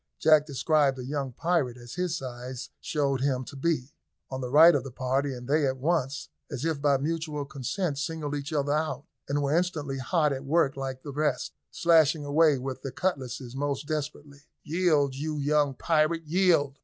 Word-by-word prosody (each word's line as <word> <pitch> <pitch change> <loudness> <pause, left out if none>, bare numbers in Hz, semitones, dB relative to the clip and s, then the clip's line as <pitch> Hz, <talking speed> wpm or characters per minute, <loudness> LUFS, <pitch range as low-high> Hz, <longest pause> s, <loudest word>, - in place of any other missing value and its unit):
Jack 155 -1 +5
descried 145 -1 +2
a 125 - -6
young 140 -1 -3
pirate, 145 -3 0
as 120 -1 -10
his 180 -2 -1
size 125 -1 -7
showed 140 -4 -1
him 130 -2 0
to 140 - -10
be, 145 -2 -1 0.4
on 130 0 -4
the 125 - -4
right 160 +5 +8
of 140 - +1
the 135 - -7
party, 130 +3 -1
and 125 -1 -7
they 145 0 +2
at 130 0 -1
once, 140 -2 -1 0.2
as 140 -1 -4
if 160 -4 -1
by 140 -1 +4
mutual 155 0 -3
consent, 140 +3 -3
singled 150 -1 -3
each 145 +1 -4
other 145 -2 0
out, 150 -3 -1 0.2
and 145 +1 0
were 140 +2 +1
instantly 155 -6 -1
hot 150 +2 +1
at 135 0 -5
work 145 -1 +2
like 135 -1 -5
the 145 - -6
rest, 150 +2 -1 0.2
slashing 160 -3 +3
away 150 0 +4
with 130 0 -5
their 135 - -5
cutlasses 130 -7 -3
most 140 0 -2
desperately. 145 -2 -5 0.2
"Yield, 155 -4 +2
you 150 +3 -3
young 145 -1 +1
pirate, 165 +2 +1
yield!" 155 -5 +2
145 Hz, 185 wpm, -27 LUFS, 135-155 Hz, 0.4 s, right